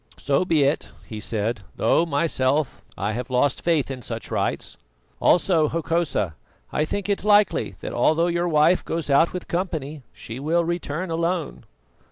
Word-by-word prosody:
"So 140 +6 +1
be 160 -5 +3
it," 140 +3 0 0.2
he 110 - -7
said, 110 +1 -1 0.2
"though 170 - +2
myself 145 -2 0 0.2
I 100 +2 -1
have 125 +3 -4
lost 130 +2 +1
faith 160 -5 +1
in 130 -1 -6
such - - -6
rites. - - -2 0.4
Also, 170 -4 +3
Hokosa, 165 - -1 0.4
I 150 - +1
think 200 +5 -3
it 200 -2 -1
likely 205 - +3
that - - -5
although 160 +7 +3
your 175 0 0
wife 165 +2 +3
goes 165 -3 -3
out 150 +5 +4
with 180 - -6
company, 160 -5 -3
she 115 +3 -8
will 165 +4 +1
return 170 0 -3
alone." 165 -1 -2
155 Hz, 160 wpm, -23 LUFS, 135-170 Hz, 0.4 s, out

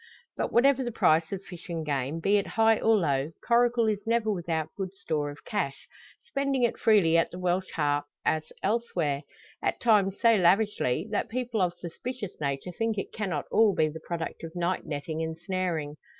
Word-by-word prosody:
But, - - -2
whatever 270 +2 +4
the 240 - -3
price 160 -6 +3
of 195 -1 -4
fish 180 -1 -11
and 165 -2 -3
game, 140 +1 -1
be 200 +5 +3
it 200 - -1
high 225 0 +5
or 225 0 +4
low, 145 -3 0
Coracle 240 0 +3
is 210 0 -2
never 230 -1 +2
without 165 -4 -2
good 190 -1 -5
store 155 -7 -2
of 145 0 -11
cash, 170 -10 -3 0.4
spending 275 +6 -1
it 240 - +1
freely 175 -7 +5
at - - +1
the 180 - -9
Welsh 180 +1 0
Harp, 145 -2 +1 0.2
as 155 0 0
elsewhere; 180 -10 0 0.4
at - - -1
times 205 -4 +3
so 230 -1 +5
lavishly, 195 - +2
that 210 - -1
people 240 -3 -2
of 175 -1 +1
suspicious 200 +5 -7
nature 140 +4 -2
think 225 +4 -1
it 195 - -4
cannot 185 -9 -2
all 220 -4 +4
be 155 -1 +2
the 160 +1 -8
product 170 -1 -5
of 165 +1 -7
night 175 +1 -1
netting 155 +2 -3
and 160 0 -3
snaring. 170 -5 -2
180 Hz, 190 wpm, -28 LUFS, 160-220 Hz, 0.4 s, high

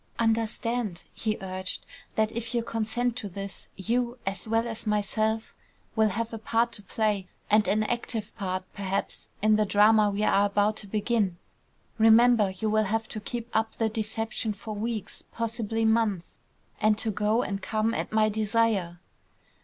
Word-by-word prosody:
"Understand," 225 -3 0
he 215 -1 -1
urged, 185 0 -3 0.3
"that 220 0 +2
if 235 +1 -4
you 235 - +1
consent 230 +2 -1
to 205 -4 -4
this, 195 +1 -7
you, 240 +5 -1
as 195 +1 -3
well 225 +1 +1
as 225 -1 -6
myself, 215 +1 0 0.4
will 220 -1 +4
have 230 +3 -3
a 225 - -4
part 230 +2 +1
to 210 - -7
play, 205 -1 -1 0.2
and 215 0 +5
an 215 +1 +2
active 225 -2 -3
part, 185 -3 -2
perhaps, 195 -1 -3
in 215 0 +5
the 215 - +4
drama 210 +1 +5
we 205 +1 -1
are 200 -1 +4
about 205 +1 +1
to 205 - -5
begin. 210 -3 0 0.6
Remember, 225 -1 +6
you 190 +3 -3
will 215 0 +3
have 220 +3 -1
to 215 - -5
keep 235 +2 -5
up 220 0 +1
the 225 -1 +1
deception 220 0 -2
for 215 +2 -7
weeks, 215 0 -4
possibly 225 -1 -1
months; 220 -5 +1 0.4
and 215 0 +3
to 220 - 0
go 210 +4 +1
and 195 0 -3
come 220 +2 0
at - - -3
my 215 0 +4
desire." 215 -4 +1
215 Hz, 165 wpm, -27 LUFS, 205-225 Hz, 0.6 s, Remember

